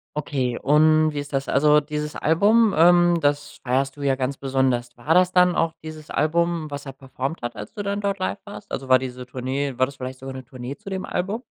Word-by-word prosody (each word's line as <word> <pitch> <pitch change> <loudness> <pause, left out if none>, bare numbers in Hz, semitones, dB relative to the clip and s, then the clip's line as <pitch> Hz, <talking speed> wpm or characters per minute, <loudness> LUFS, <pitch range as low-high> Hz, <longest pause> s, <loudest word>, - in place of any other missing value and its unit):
Okay. 130 -5 -2
Und 155 +2 +4
wie 145 - -3
ist 145 +1 -7
das? 135 0 -1
Also, 150 +2 +4
dieses 150 0 -5
Album, 205 +7 +3
ähm, 175 +1 +5
das 145 0 -1
feierst 135 +2 0
du - - -9
ja 135 -1 +2
ganz 130 +1 -3
besonders. 130 -3 0
War 150 +7 0
das 180 0 +4
dann 180 -1 +4
auch 165 0 +1
dieses 155 -1 -9
Album, 165 0 0
was 145 0 -6
er 135 - -6
performt 135 +2 -5
hat, 120 0 -5
als - - -8
du 205 - -5
dann 200 +1 -2
dort 200 -1 -1
live 185 - -2
warst? 205 0 -11
Also, 135 0 -5
war 130 - +7
diese 125 -1 -6
Tournee 130 +1 -3
war 130 - +4
das 140 +1 -10
vielleicht 130 0 -7
sogar 135 0 -7
'ne 130 -1 -8
Tournee 130 +1 -8
zu 195 - -11
dem 190 -1 -4
Album? 200 +7 -3
145 Hz, 230 wpm, -23 LUFS, 130-170 Hz, -, war